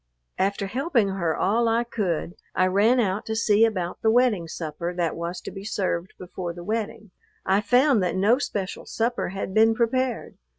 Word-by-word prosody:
After 200 +1 0
helping 240 - 0
her 170 -4 -1
all 230 +5 +2
I 230 +1 +2
could, 185 -8 -2 0.2
I 185 - +3
ran 205 +7 +3
out 200 -2 0
to 220 - -2
see 220 0 +4
about 185 -6 -3
the 220 - +3
wedding 225 -7 +3
supper 170 +2 -5
that 170 -3 -1
was 170 +2 -4
to - - -7
be 195 - -8
served 190 -4 -2
before 180 -1 -6
the 175 0 -9
wedding. 215 0 -4 0.3
I 195 +2 +3
found 250 0 +3
that 180 -1 0
no 210 +7 +3
special 200 -8 -4
supper 235 -2 -1
had 190 0 -5
been 225 +1 +4
prepared. 250 +1 -1
205 Hz, 180 wpm, -25 LUFS, 185-230 Hz, 0.3 s, see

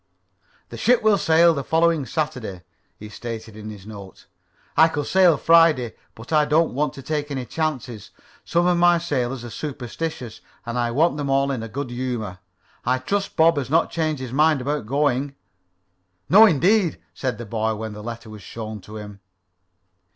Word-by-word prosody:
"The - - -8
ship 245 -1 +3
will 215 -2 +4
sail 165 +1 +5
the 140 -3 -3
following 165 -2 +1
Saturday," 125 - -4 0.3
he 105 - -10
stated 110 0 -7
in 110 0 -8
his 100 -3 -10
note. 100 -3 -11 0.5
"I 160 - +7
could 145 -3 -3
sail 180 -5 +4
Friday, 160 -8 +4 0.2
but 115 +6 -9
I 150 -1 +5
don't 155 +3 +2
want 150 +3 -1
to 135 - -10
take 150 +1 -3
any 135 -3 -4
chances. 130 -8 -4 0.3
Some 170 +1 +1
of 180 -1 +2
my 175 0 +5
sailors 135 -7 -2
are 120 - -8
superstitious, 130 -2 -6 0.2
and 120 +1 -3
I 120 -1 0
want 150 +5 +2
them 145 -2 -3
all 135 +1 +2
to 135 - 0
be 115 - -5
in 115 - -8
good 135 0 -4
humor. 120 -7 -4 0.4
I 125 +1 +1
trust 195 +10 -2
Bob 160 0 +4
has 135 -3 -2
not 165 +3 +2
changed 155 -5 -2
his 125 -1 -7
mind 155 +1 +3
about 140 -3 -3
going." 140 0 0 0.9
"No 215 +4 +8
indeed," 180 +2 +2 0.2
said 130 -4 -3
the 120 - -7
boy, 110 +1 -1
when 110 0 -6
the 105 - -9
letter 115 0 -8
was 105 -1 -10
shown 110 -2 -7
to 105 +4 -10
him. 105 -1 -9
135 Hz, 185 wpm, -22 LUFS, 115-160 Hz, 0.9 s, No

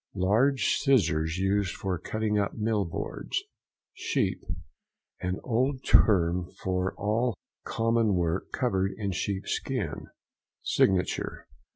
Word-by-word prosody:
—Large 110 +9 +3
scissors 85 - +2
used 95 0 +1
for 95 -3 -2
cutting 110 -1 -1
up 100 - -1
mill 110 -2 0
boards. 85 - -3 0.5
SHEEP.—An 85 +2 -4
old 130 +3 0
term 90 -3 +4
for 95 0 0
all 110 +3 0 0.3
common 115 -2 +2
work 85 0 -1
covered 95 -7 0
in 100 -3 -2
sheep 95 +1 -2
skin. - - -3 0.6
SIGNATURE. 95 -2 +1
100 Hz, 100 wpm, -28 LUFS, 90-115 Hz, 0.6 s, term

